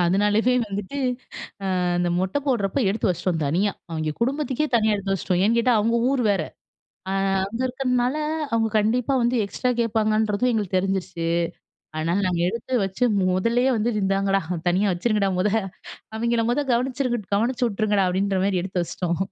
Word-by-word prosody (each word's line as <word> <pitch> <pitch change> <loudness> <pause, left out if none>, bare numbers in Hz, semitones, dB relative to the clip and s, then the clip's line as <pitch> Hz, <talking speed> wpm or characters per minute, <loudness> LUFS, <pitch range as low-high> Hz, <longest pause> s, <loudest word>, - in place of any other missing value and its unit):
அதனாலயே 210 +7 +2
வந்துட்டு, 205 +7 -5 1.0
அந்த 175 0 +1
மொட்டை 190 +9 0
போடுறப்போ 235 -1 0
எடுத்து 215 - 0
வச்சிட்டோம் 175 -2 -1
தனியா. 190 +8 +1 0.2
அவிங்கெ 155 -1 -2
குடும்பத்துக்கே 275 +3 0
தனியா 215 -1 +2
எடுத்து 195 -1 -2
வச்சிட்டோம். 180 -1 -1
ஏன்னு 230 +2 +3
கேட்டா 240 0 +3
அவங்க 230 +2 +1
ஊர் 270 -3 +1
வேற. 190 -5 +1 0.7
அ - - -1 0.3
அங்க 230 +5 -6
இருக்கறதுனால 250 +1 0 0.4
அவங்க 225 -1 +2
கண்டிப்பா 230 +5 +1
வந்து 240 +1 +1
எக்ஸ்ட்ரா 250 +5 -2
கேட்பாங்கன்றதும் 215 +1 +1
எங்களுக்கு 205 -4 -1
தெரிஞ்சிருச்சு. 185 -3 -2 0.7
அதனால 165 +4 0
நாங்க 175 -1 -1
எடுத்து 235 +4 -6
வச்சு 195 +6 -1 0.3
முதல்லயே 235 +7 +2
வந்து 225 +3 +1
"இந்தாங்கடா, 195 0 +1 0.3
தனியா 190 +3 +2
வச்சுருங்கடா 200 +1 +1
மொத! 210 - +2 0.7
அவிங்கள 235 0 +1
மொத 270 +5 +1
கவனிச்சிருங்க 250 -1 0
கவனிச்சு 245 +3 0
விட்ருங்கடா!" 205 -3 +1
அப்படின்ற 190 +1 0
மாதிரி 190 -3 +1
எடுத்து 185 -2 -2
வச்சிட்டோம். 170 0 -3
210 Hz, 145 wpm, -23 LUFS, 190-240 Hz, 1.0 s, ஏன்னு